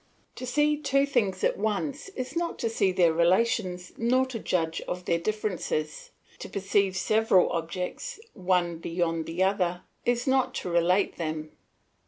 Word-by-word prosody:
To 255 - -5
see 295 +3 +2
two 275 -2 +2
things 210 -9 0
at - - +1
once 220 - -2
is 255 +3 -5
not 340 0 -1
to 230 - -1
see 195 -4 +2
their 175 -3 +3
relations 180 +1 +1
nor 255 +3 +3
to 255 -3 -5
judge 165 -5 -1
of 180 0 -4
their 170 - +1
differences; 180 -6 -2 0.3
to - - -7
perceive 195 -1 +1
several 215 -1 +3
objects, 180 - -4
one 180 -3 0
beyond 165 -1 -1
the 170 +3 0
other, 180 -2 0 0.2
is 245 0 +1
not 265 -1 +2
to 180 - -3
relate 180 +3 +2
them. 155 -2 -4
190 Hz, 155 wpm, -27 LUFS, 175-240 Hz, 0.3 s, their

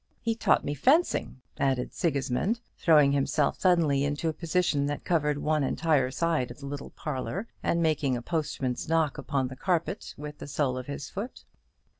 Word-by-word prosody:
He 230 - 0
taught 225 - +2
me 145 - -1
fencing," 265 - +2 0.2
added 130 -2 0
Sigismund, 145 - 0 0.2
throwing 150 -4 +5
himself 140 +1 +1
suddenly 165 -7 +3
into 145 +3 -1
a - - -2
position 165 -4 +1
that 145 0 -4
covered 150 -4 +1
one 150 0 +1
entire 145 -2 +2
side 155 -2 0
of 120 - -9
the 140 - -8
little 140 0 -6
parlour, 155 - -4
and 170 0 +1
making 150 -5 +1
a - - -5
postman's 145 -5 -2
knock 160 -3 +1
upon 135 -2 -1
the 130 - -8
carpet 170 +3 -1
with 150 0 -8
the - - -7
sole 140 -2 0
of 130 0 -5
his 140 0 -6
foot. 215 +6 -6
150 Hz, 175 wpm, -28 LUFS, 140-165 Hz, 0.2 s, throwing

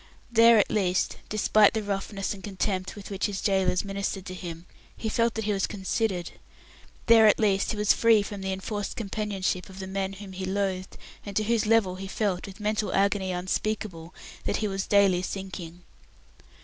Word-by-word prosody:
There 230 0 +7
at 205 - +3
least 185 -3 +1
despite 215 0 +4
the 220 - -1
roughness 195 0 -3
and 195 - -11
contempt 190 -1 -2
with 205 -1 -9
which 195 +1 0
his 200 -2 -4
gaolers 190 -2 +1
ministered 195 -1 -3
to 185 - -6
him 170 -2 -7 0.3
he 220 - -3
felt 230 +1 +1
that 220 - -2
he 210 - +1
was 195 -1 0
considered. 190 -2 -2 0.7
There 225 -1 +7
at 210 - +5
least 200 -3 +2
he 220 - -2
was 210 0 +4
free 225 -3 +4
from 200 -1 -7
the 190 0 -2
enforced 200 +2 -4
companionship 200 -3 -2
of 190 - -12
the 190 - -5
men 190 0 -3
whom 195 0 -9
he 185 +1 -5
loathed, 190 -1 -2 0.3
and 200 -1 -8
to 215 - +2
whose 225 0 +1
level 210 -5 +3
he 195 +1 -6
felt, 195 -2 -1
with 195 +1 -11
mental 210 0 -1
agony 195 -1 +1
unspeakable, 180 -1 -3 0.3
that - - 0
he 215 - -1
was 195 -1 -3
daily 200 -3 +4
sinking. 185 -2 -6
195 Hz, 190 wpm, -27 LUFS, 190-210 Hz, 0.7 s, There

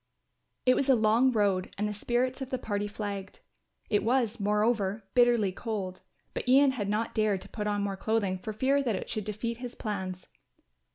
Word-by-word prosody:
It 255 - +6
was 275 +1 0
a 265 - +7
long 225 +3 +4
road 200 -5 +1
and 210 +1 0
the 210 - -3
spirits 250 +5 -1
of 265 - -4
the 260 - -1
party 205 -4 -2
flagged. 200 -2 -6 0.5
It 205 - +1
was, 235 -1 +1
moreover, 210 0 +1
bitterly 240 -5 +4
cold, 190 -3 -4 0.3
but - - -3
Ian 275 +1 +6
had 210 -6 -3
not 215 +2 -1
dared 215 -3 +1
to - - -11
put 210 -2 -4
on 205 -1 0
more 195 -1 -2
clothing 200 -3 0
for 215 - -5
fear 265 +6 +2
that 240 -6 0
it - - -5
should 215 -3 -2
defeat 215 +2 -3
his 245 0 -7
plans. 190 -4 -4
215 Hz, 190 wpm, -29 LUFS, 200-240 Hz, 0.5 s, a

